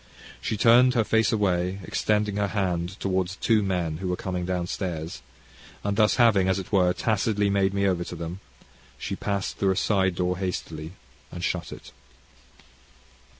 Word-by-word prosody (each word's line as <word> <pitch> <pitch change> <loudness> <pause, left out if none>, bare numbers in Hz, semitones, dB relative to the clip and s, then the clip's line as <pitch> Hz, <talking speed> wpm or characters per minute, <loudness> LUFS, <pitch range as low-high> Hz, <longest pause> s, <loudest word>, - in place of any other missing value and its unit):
She 105 - -2
turned 120 +4 +5
her 115 - +3
face 110 -1 +2
away, 95 -3 +1
extending 105 0 0
her 100 0 +1
hand 90 -2 -2
towards 95 -1 -1
two 110 +1 +2
men 90 -5 -1
who 95 +2 -4
were 90 - 0
coming 90 -1 -3
down 90 -1 -1
stairs; 85 -3 -4 0.6
and 100 0 -1
thus 105 0 +4
having, 105 -6 +4
as 95 - +2
it 95 - -6
were, 90 -3 +4
tacitly 105 +1 0
made 100 -1 +2
me 100 0 0
over 90 -3 +1
to - - -7
them, 85 +2 -6 0.6
she - - -4
passed 100 -1 -3
through 100 - +1
a 95 - +2
side 95 -3 +2
door 90 +1 -1
hastily 80 -3 -4 0.4
and - - -7
shut - - -2
it. - - -10
95 Hz, 170 wpm, -26 LUFS, 90-105 Hz, 0.6 s, turned